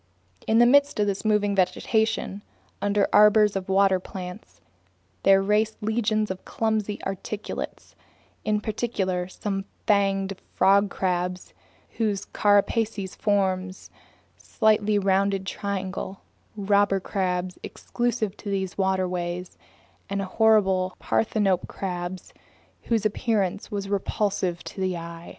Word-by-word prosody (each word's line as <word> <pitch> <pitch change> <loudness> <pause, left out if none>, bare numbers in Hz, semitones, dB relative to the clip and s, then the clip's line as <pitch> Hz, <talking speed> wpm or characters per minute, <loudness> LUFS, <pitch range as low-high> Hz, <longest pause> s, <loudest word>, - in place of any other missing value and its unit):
In 220 - +3
the 240 - +7
midst 285 0 +4
of 210 - +3
this 200 -1 -2
moving 210 -2 +2
vegetation, 205 +2 0 0.4
under 205 0 +2
arbors 210 0 +6
of 195 -1 -3
water 190 -1 +4
plants, 180 - -9 0.6
there 195 0 +5
raced 210 +2 +1
legions 215 -1 0
of 190 - -7
clumsy 215 -2 -1
articulates, 200 +2 -5 0.5
in 210 -1 0
particular 200 -5 -2
some 195 +1 -4 0.2
fanged 195 -2 +2 0.2
frog 200 +1 +4
crabs 180 -1 -2 0.4
whose 210 -3 0
carapaces 205 -1 +1
form 190 -3 0
a - - -8 0.6
slightly 215 -1 +2
rounded 195 0 +1
triangle, 190 -1 -4 0.4
robber 200 -1 +2
crabs 180 -2 -2
exclusive 235 -4 -2
to 205 - -7
these 190 -1 -3
waterways, 180 -2 -1 0.5
and 200 0 -1
horrible 190 -3 +2
parthenope 200 -5 +1
crabs 180 -1 -5 0.5
whose 225 -3 0
appearance 205 -2 0
was 200 -3 -4
repulsive 195 -3 -1
to 190 - -7
the 185 -2 0
eye. 170 0 -8
200 Hz, 115 wpm, -25 LUFS, 185-210 Hz, 0.6 s, the